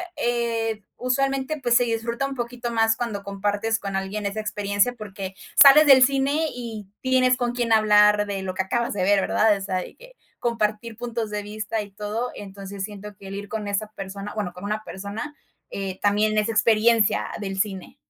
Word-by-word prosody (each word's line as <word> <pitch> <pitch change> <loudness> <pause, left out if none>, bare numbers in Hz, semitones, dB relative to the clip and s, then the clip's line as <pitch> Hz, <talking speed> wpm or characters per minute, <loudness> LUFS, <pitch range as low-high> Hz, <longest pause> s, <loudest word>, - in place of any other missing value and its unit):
eh, 230 -2 -1 0.2
usualmente, 270 +3 -1
pues 240 -2 +2
se 245 - +5
disfruta 235 +2 -2
un 275 - -4
poquito 240 0 -4
más 225 0 +2
cuando 230 -5 -3
compartes 205 +3 -1
con 195 -1 -5
alguien 195 +2 -3
esa 200 +2 -2
experiencia, 205 +2 0
porque 195 -4 -7 0.2
sales 295 +2 +9
del 265 -2 +8
cine 275 +4 +2
y 225 -5 -7
tienes 255 -1 +3
con 240 -1 -1
quién 240 -2 -1
hablar 210 -1 +5
de 200 -1 -4
lo 185 -1 -4
que 190 - 0
acabas 235 +4 -1
de 190 -3 -1
ver, 200 0 +4
¿verdad? 215 +1 +3
O - - -9
sea, 190 -1 -2
de 185 - -6
que, - - -16 0.2
compartir 225 -1 -1
puntos 235 -2 -3
de 210 -1 -3
vista 215 +1 -3
y 205 - -13
todo, 210 +5 -3
entonces 195 -1 -8
siento 210 0 -8
que 195 - -12
el 195 - -6
ir 200 0 -7
con 215 -2 -4
esa 205 +1 -2
persona, 195 +1 -6
bueno, 205 -5 -2
con 180 - -11
una 215 +1 -2
persona, 205 +10 -6 0.3
eh, 190 -1 -5
también 210 +1 +2
es 210 - 0
experiencia 225 0 +3
del 195 -2 -4
cine. 195 -3 -3
215 Hz, 190 wpm, -24 LUFS, 200-240 Hz, 0.3 s, sales